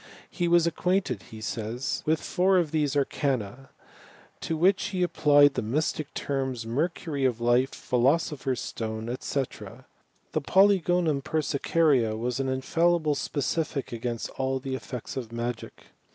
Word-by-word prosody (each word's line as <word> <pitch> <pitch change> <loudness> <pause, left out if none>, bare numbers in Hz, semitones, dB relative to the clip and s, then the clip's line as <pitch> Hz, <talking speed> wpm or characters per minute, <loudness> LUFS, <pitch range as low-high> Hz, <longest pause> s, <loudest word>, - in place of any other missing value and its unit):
He 175 -2 -1
was 170 -1 +4
acquainted, 170 - 0
he 110 -1 -10
says, 115 +5 -3
with 160 0 +3
four 190 +1 +2
of 165 -5 +1
these 150 -3 +1
arcana, 135 -3 -1 0.7
to 160 - -3
which 185 +4 +3
he 185 -3 -1
applied 145 -4 +5
the - - -1
mystic 145 +5 -1
terms, 130 -4 -2
mercury 145 +3 -2
of 125 -3 +1
life, 120 +3 +3
philosopher 135 +2 0
s 125 - -4
stone, 110 +1 -4
&c. 140 - -1 0.9
The - - -1
polygonum 180 -6 +3
persicaria 140 -5 +1
was 120 +3 -2
an 135 -1 -1
infallible 160 +4 +1
specific 145 0 -2
against 120 0 -4
all 135 0 0
the 135 0 -5
effects 130 0 -6
of 120 -4 -5
magic. 120 0 -5
140 Hz, 135 wpm, -27 LUFS, 120-160 Hz, 0.9 s, applied